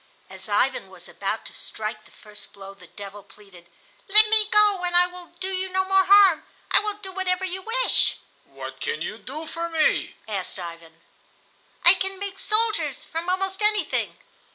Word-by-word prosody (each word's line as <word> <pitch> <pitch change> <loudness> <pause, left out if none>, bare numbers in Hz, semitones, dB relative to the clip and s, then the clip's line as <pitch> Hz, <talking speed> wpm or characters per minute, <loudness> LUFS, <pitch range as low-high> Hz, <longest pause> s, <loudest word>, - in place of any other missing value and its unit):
As - - -8
Ivan - - 0
was - - -14
about - - -5
to - - -8
strike 215 0 -6
the - - -19
first 210 0 -13
blow 195 0 -11
the 190 -3 -17
devil 205 +2 -11
pleaded: 195 -4 -18 0.4
"Let 425 +2 +8
me 430 -1 +6
go 415 -3 +3
and 350 0 -1
I 355 - +6
will 360 -1 -10
do 380 0 -3
you 375 0 -3
no 375 0 -1
more 385 0 +3
harm. 395 -4 +6 0.3
I - - +6
will 420 0 -3
do 395 -2 -10
whatever 375 0 -2
you 375 +1 -5
wish." 485 +5 +1 0.3
"What - - -10
can 460 0 -3
you - - -6
do 300 +5 -8
for 335 +1 -5
me?" 320 -2 0
asked 195 -4 -4
Ivan. 165 -2 -10 0.8
"I 345 - +10
can 385 0 -3
make 390 0 -5
soldiers 435 +1 +1
from 335 +1 -5
almost 385 +2 -2
anything." 420 0 0
365 Hz, 180 wpm, -23 LUFS, -, 0.8 s, I